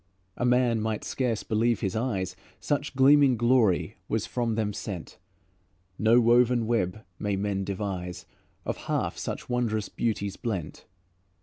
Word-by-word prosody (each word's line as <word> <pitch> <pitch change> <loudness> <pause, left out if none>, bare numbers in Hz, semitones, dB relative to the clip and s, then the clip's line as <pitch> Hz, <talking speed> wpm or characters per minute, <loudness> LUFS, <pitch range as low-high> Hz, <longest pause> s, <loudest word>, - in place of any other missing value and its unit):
A 120 - -1
man 125 -2 +3
might 110 -1 -2
scarce 120 -5 -1
believe 115 +1 +1
his 95 +2 -1
eyes, 100 -6 -1 0.2
Such 145 -1 -2
gleaming 135 -1 +6
glory 120 -5 +2
was - - -1
from 120 -3 -1
them 105 -2 -1
sent; 95 -4 -6 0.8
No 115 +3 +5
woven 120 0 +4
web 110 -3 -1 0.2
may 100 -1 -1
men 100 0 -1
devise 95 -2 -4 0.4
Of - - -2
half - - -1
such - - -5
wondrous 115 -4 -1
beauties 100 -4 -2
blent. 95 -10 -4
110 Hz, 135 wpm, -27 LUFS, 100-120 Hz, 0.8 s, gleaming